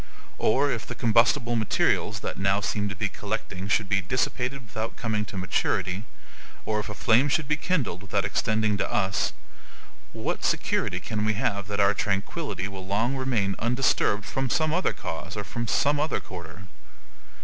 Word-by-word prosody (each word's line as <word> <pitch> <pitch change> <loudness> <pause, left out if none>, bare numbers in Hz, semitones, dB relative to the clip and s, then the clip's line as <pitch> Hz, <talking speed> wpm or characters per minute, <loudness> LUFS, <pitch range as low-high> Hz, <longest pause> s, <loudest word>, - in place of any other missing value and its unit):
Or 140 +5 +3
if 115 -3 -3
the - - -5
combustible 120 +1 +3
materials 110 -3 +1
that - - -4
now 95 +1 +3
seem 105 0 -1
to 95 - -5
be - - 0
collecting 95 +2 -4
should 105 0 +2
be 95 -1 +2
dissipated 125 +5 -1
without 110 +1 -4
coming 110 -2 -1
to 95 - -8
maturity, 90 +2 0 0.6
or 110 -1 0
if 105 - -4
a - - -5
flame 125 +5 +4
should 145 +1 +1
be 150 - +2
kindled 150 - -1
without 100 - -1
extending 110 -1 +1
to - - -1
us, 95 -7 +1 0.8
what - - -3
security - - +1
can 105 -1 -3
we 110 0 +1
have 100 -2 -1
that 100 0 -3
our 100 0 +5
tranquillity 100 - -2
will 95 -1 -8
long 115 +7 +1
remain 120 -7 0
undisturbed 115 -4 +2
from 135 -1 -1
some 155 +2 +2
other 180 +2 +2
cause 85 +5 -5
or 105 - -2
from 115 +3 -4
some 145 +5 +2
other 155 +2 0
quarter? 85 -1 -9
110 Hz, 170 wpm, -27 LUFS, 100-125 Hz, 0.8 s, our